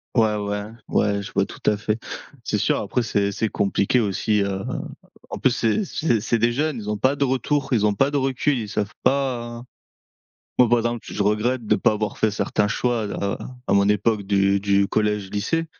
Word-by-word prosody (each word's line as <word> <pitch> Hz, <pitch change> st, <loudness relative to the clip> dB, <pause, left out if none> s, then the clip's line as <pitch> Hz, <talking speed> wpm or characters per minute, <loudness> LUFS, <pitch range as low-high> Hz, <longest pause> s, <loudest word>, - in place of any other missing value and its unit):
Ouais, 110 Hz, -2 st, +3 dB
ouais. 105 Hz, 0 st, -3 dB, 0.2 s
Ouais, 100 Hz, -1 st, +1 dB
je 100 Hz, -, -8 dB
vois -, -, +2 dB
tout -, -, -11 dB
à 105 Hz, -, +2 dB
fait. 110 Hz, +1 st, -2 dB, 0.5 s
C'est -, -, 0 dB
sûr, -, -, +1 dB
après 125 Hz, -, -1 dB
c'est 100 Hz, -3 st, 0 dB
c'est 110 Hz, +1 st, -1 dB
compliqué 100 Hz, +4 st, +1 dB
aussi, 105 Hz, 0 st, +1 dB
heu, 95 Hz, 0 st, -3 dB, 0.7 s
en -, -, -4 dB
plus, 130 Hz, -, +3 dB
c'est 115 Hz, -, +1 dB
c'est 120 Hz, -, 0 dB
c'est 115 Hz, -, 0 dB
des 115 Hz, -, +3 dB
jeunes, 150 Hz, 0 st, -1 dB
ils 105 Hz, -1 st, -5 dB
ont 105 Hz, -, -1 dB
pas 135 Hz, +2 st, +3 dB
de 140 Hz, -, -5 dB
retour, 135 Hz, +2 st, 0 dB
ils 105 Hz, -3 st, +3 dB
ont 105 Hz, -, +2 dB
pas 135 Hz, +7 st, +2 dB
de 145 Hz, -, -1 dB
recul, 135 Hz, 0 st, +1 dB
ils 110 Hz, -2 st, -4 dB
savent 105 Hz, +1 st, -2 dB
pas, 135 Hz, -2 st, +2 dB
hein. 120 Hz, +1 st, -8 dB, 0.9 s
Moi, 125 Hz, -, +6 dB
par 120 Hz, 0 st, +4 dB
exemple, 120 Hz, 0 st, -2 dB
je 105 Hz, -, -3 dB
regrette 110 Hz, +4 st, 0 dB
de -, -, +4 dB
pas -, -, +3 dB
avoir 105 Hz, -1 st, -3 dB
fait 110 Hz, -, +2 dB
certains 105 Hz, 0 st, 0 dB
choix-là, 110 Hz, -3 st, -1 dB, 0.3 s
à -, -, +2 dB
mon 100 Hz, 0 st, +4 dB
époque 105 Hz, 0 st, +1 dB
du 100 Hz, 0 st, +2 dB
du 100 Hz, 0 st, +2 dB
collège, 105 Hz, -2 st, 0 dB
lycée 165 Hz, +12 st, -1 dB
110 Hz, 210 wpm, -23 LUFS, 100-125 Hz, 0.9 s, Moi